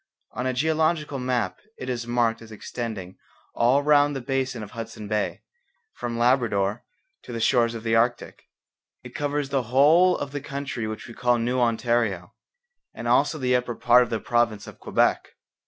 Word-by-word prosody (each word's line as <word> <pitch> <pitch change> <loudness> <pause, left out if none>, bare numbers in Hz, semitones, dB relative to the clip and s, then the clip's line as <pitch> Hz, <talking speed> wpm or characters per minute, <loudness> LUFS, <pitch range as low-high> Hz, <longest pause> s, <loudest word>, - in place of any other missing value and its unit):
On 125 +2 -3
a 130 - 0
geological 155 +1 0
map 125 -6 -1 0.2
it 130 - -7
is 120 -2 -3
marked 120 -2 +1
as 115 -1 -12
extending 110 -4 -6 0.3
all 130 +5 +3
round 145 -1 +4
the - - -2
basin 130 -2 -2
of 105 - -10
Hudson 115 -2 -7
Bay, 105 0 -2 0.5
from 120 -1 -4
Labrador 120 -4 +1 0.4
to - - -11
the 115 - -4
shores 115 0 +2
of 110 - -7
the 115 -1 +1
Arctic. 120 +1 0 0.6
It - - -11
covers 145 -1 -2
the 135 -1 +1
whole 155 +8 +5
of 140 - -5
the 145 -1 -4
country 140 -5 -4
which 110 0 -6
we 120 - -10
call 120 +1 +2
New 120 +2 0
Ontario, 115 -6 0 0.6
and - - -6
also 155 - +3
the 125 -3 +1
upper 125 -1 -1
part 125 +1 +5
of 120 - 0
the 115 -2 -1
province 120 -3 0
of - - -12
Quebec. - - 0
120 Hz, 175 wpm, -25 LUFS, 115-135 Hz, 0.6 s, whole